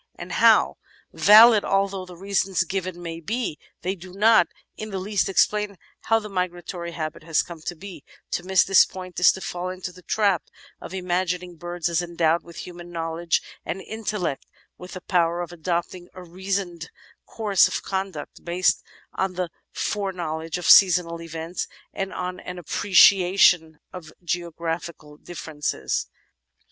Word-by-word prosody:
and - - -9
"how?" - - +4 0.4
Valid 215 +1 +8
although 195 -1 0
the 180 -1 -11
reasons 195 -1 0
given 185 0 -4
may 165 -1 -5
be, 210 -1 -3 0.2
they 185 +2 0
do 185 -1 -12
not 220 +3 +5 0.3
in 215 - -6
the 195 - -4
least 195 +1 -1
explain 210 +1 +1 0.3
how 225 - +4
the 215 -1 -5
migratory 175 -2 -4
habit 155 -2 -5
has 160 0 +1
come 170 -3 -10
to 175 - -5
be; 170 -3 -10 0.3
to - - -1
miss 190 +1 +3
this 195 - +6
point 185 -1 -7
is 180 - +7
to 190 - -8
fall 180 0 -4
into 185 0 -6
the 180 +1 -15
trap 200 0 +1 0.4
of - - -9
imagining 180 -1 -2
birds 175 +1 -4
as 170 0 +1
endowed 170 -1 +1
with 170 -1 -10
human 175 -1 -10
knowledge 165 0 -1 0.2
and 185 - -4
inteUect 210 -8 -3 0.2
— - - -43
with 180 - -10
the 185 - -7
power 175 -3 +1
of 175 -1 -4
adopting 175 +1 -3
a 185 - -9
reasoned 180 -1 -4 0.4
course 205 -5 +3
of - - -4
conduct, 190 -6 -5
based 175 +1 +1 0.3
on 190 -1 -1
the 180 -2 -3 0.2
foreknowledge 170 -5 -3
of 180 - -6
seasonal 175 -3 +6
events 165 +1 -5 0.3
and 195 0 -3
on 180 0 -4
an 180 0 -8
appreciation 180 -2 +4 0.2
of 165 -4 -9
geographical 170 -3 -4
differences. 145 - -3
180 Hz, 155 wpm, -24 LUFS, 170-190 Hz, 0.4 s, Valid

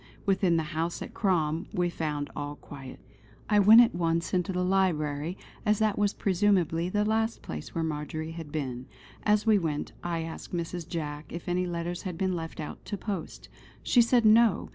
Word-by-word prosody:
Within 190 -4 +3
the 160 - +1
house 165 +2 -2
at - - -10
Crom 165 -6 0
we 180 -3 +1
found 150 -4 -3
all 145 0 -4
quiet. 135 -2 -10 0.5
I 210 -1 +4
went 215 +4 +9
at 235 - +3
once 170 -1 0
into 180 0 +1
the 180 0 0
library, 170 -3 0 0.3
as 210 0 +3
that 215 -1 +2
was 205 -1 +1
presumably 180 -3 +2
the 210 +2 +1
last 220 +1 0
place 75 -1 -7
where 165 - 0
Marjory 155 +1 -3
had 165 -3 -8
been. 130 -4 -4 0.3
As 210 0 +2
we 215 -2 +5
went, 155 -4 -2
I 170 -2 -2
asked 165 +2 -7
Mrs. 170 0 -4
Jack 150 -3 -4
if 170 +2 -7
any 180 +1 0
letters 175 +1 -3
had 180 -4 -5
been 185 0 0
left 165 -1 -6
out 150 - -6
to 205 - -4
post. 195 -5 -5 0.4
She 245 - +5
said 235 0 +3
no! 220 -1 +5
175 Hz, 185 wpm, -28 LUFS, 160-200 Hz, 0.5 s, went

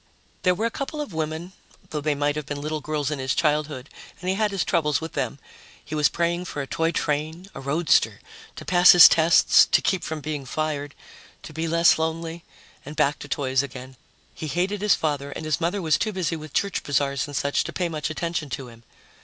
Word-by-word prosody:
There 180 -1 +3
were 220 +5 -1
a 230 - 0
couple 285 +4 -5
of 290 - -5
women, 160 +3 -4 0.4
though 150 -2 -3
they 150 0 0
might 145 +1 0
have 150 -1 -5
been 145 -1 -4
little 155 +1 -3
girls 150 0 -2
in 150 - -3
his 130 0 -1
childhood, 150 -3 0 0.3
and 180 - -4
he - - +2
had 215 +1 +1
his 195 -3 -1
troubles 150 -3 +1
with 160 0 -7
them. - - -2 0.5
He - - -8
was 150 -1 +3
praying 170 +1 -1
for 155 - -6
a - - -6
toy 165 +4 0
train, 155 +5 -2
a - - -8
roadster, 150 +3 +2 0.4
to - - -9
pass 180 0 +7
his 175 - +11
tests, 165 +1 +5
to - - +4
keep 190 -3 0
from 160 -1 -4
being 150 -1 -4
fired, 145 +1 -3 0.5
to 155 - -10
be 160 +2 -2
less 170 0 +4
lonely, 165 +1 -3 0.4
and 145 +2 -9
back 140 0 +1
to - - -8
toys 130 -2 0
again. 130 -1 -8 0.4
He 155 - -6
hated 185 +7 -1
his 210 -1 +4
father, 145 -3 -2
and - - -6
his 155 +2 -1
mother 180 +3 -1
was 160 -2 +2
too 215 - 0
busy 185 -4 -2
with 155 -2 -9
church 200 +4 -1
bazaars 140 -1 0
and 145 - -8
such 140 +1 +1
to - - -4
pay 180 - -1
much 155 -2 -3
attention 165 -2 -3
to 130 -1 -5
him. 115 -1 -15
155 Hz, 220 wpm, -24 LUFS, 145-170 Hz, 0.5 s, his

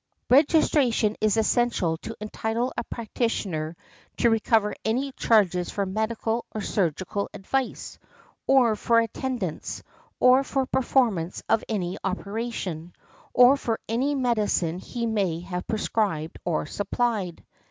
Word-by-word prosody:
Registration 270 -6 +4
is 215 0 +2
essential 220 -7 +2
to 225 +7 -8
entitle 220 +3 -2
a - - -2
practitioner 195 -9 -3 0.4
to 235 - +3
recover 220 -1 +2
any 255 +5 0
charges 190 -8 +2
for 200 - -1
medical 220 +3 -1
or - - -1
surgical 190 +1 -1
advice, 255 +7 -3 0.5
or 250 -5 +5
for 230 +2 +3
attendance, 230 -5 -3 0.4
or 255 +2 +6
for 270 -1 -1
performance 240 -10 +1
of 225 - +2
any 185 -5 -2
operation, 195 -4 -4 0.4
or 250 +2 +7
for 230 -5 -2
any 260 +6 0
medicine 210 -9 0
he 235 +4 -4
may 195 -7 0
have 180 0 -5
prescribed 205 -7 -1
or 170 -4 -1
supplied. 205 0 -2
220 Hz, 120 wpm, -25 LUFS, 190-240 Hz, 0.5 s, or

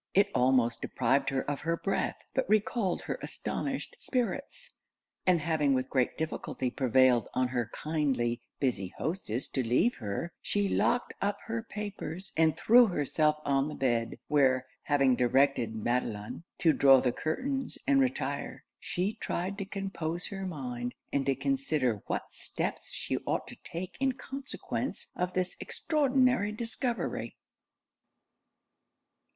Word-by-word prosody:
' - - -58
It 200 +1 +5
almost 125 -2 +3
deprived 130 +2 +1
her 135 -1 0
of 145 +2 -2 0.2
breath, 195 - 0 0.2
but 265 - 0
recalled 210 -2 +1
her - - -3
astonished - - -3
spirits; 250 +1 -2 0.6
and 180 -2 +5
having 150 -3 +2
with 130 0 -1
great 130 -3 +1
difficulty 155 -5 -2
prevailed 130 -3 +4
on 130 0 +2
her 120 -3 -1
kindly 135 -7 0 0.2
busy 100 -9 -1
hostess 150 - -2
to 135 - -1
leave 125 - +2
her, 110 +9 -4
she 205 -1 0
locked 240 +5 +1
up 200 +1 +1
her 230 0 -2
papers, 205 -5 -6
and 160 -1 +3
threw 240 +1 +7
herself 150 -2 +1
on 135 0 +2
the 150 - -5
bed; 120 -3 0
where, 130 -3 +3 0.2
having 140 -3 +4
directed 125 -2 +2
Madelon 110 +3 -2
to 160 -2 +4
draw 135 -2 +7
the 125 -1 +1
curtains 265 - -2
and 280 -1 +4
retire, 265 0 -2 0.2
she 185 +4 -1
tried 185 0 -3
to 195 - -2
compose 185 -4 -3
her 195 -1 -4
mind, 125 -7 -4 0.2
and 140 -1 +1
to 135 - +3
consider 150 - 0
what - - -3
steps - - -4
she - - -2
ought - - 0
to - - -9
take 175 +2 -7
in 270 -1 +2
consequence 270 +1 -5
of 180 0 -1
this 185 -1 -1
extraordinary 260 -8 +2
discovery. 235 +2 -2
155 Hz, 140 wpm, -30 LUFS, 130-205 Hz, 0.6 s, threw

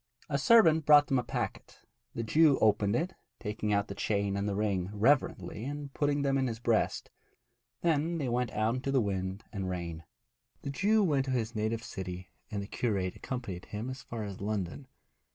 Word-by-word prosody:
A 140 -1 0
servant 160 -6 +5
brought 145 -1 +8
them 135 -2 +1
a - - -2
packet. - - -5 0.3
The 115 - -2
Jew 150 +4 +5
opened 105 -1 +3
it, 175 +7 -1 0.3
taking 105 -1 -3
out 100 0 +2
the - - -5
chain 100 -1 0
and 100 +1 -1
the 100 - -2
ring 100 -3 0
reverently 110 0 +1
and 145 +1 -5
putting 145 -1 +1
them 135 -1 +2
in 130 - +1
his 115 -2 -3
breast. 115 -1 0 0.7
Then 165 0 +1
they 140 -5 -2
went 120 0 0
out 110 +2 0
into 130 +2 -3
the 135 - +3
wind 95 -2 -2
and 95 -2 -3
the - - -2
rain. 85 -2 -4 0.6
The 140 - -3
Jew 210 +8 +3
went 145 -7 +2
to 135 - -2
his 115 -3 -1
native 110 +1 -1
city, 90 -2 -6 0.2
and 100 -1 -3
the - - -8
curate 100 -6 -1
accompanied 120 -9 -5
him 110 +5 -5
as 130 - -7
far 115 -2 -6
as 100 -2 -7
London. 105 +5 -3
115 Hz, 195 wpm, -31 LUFS, 100-140 Hz, 0.7 s, brought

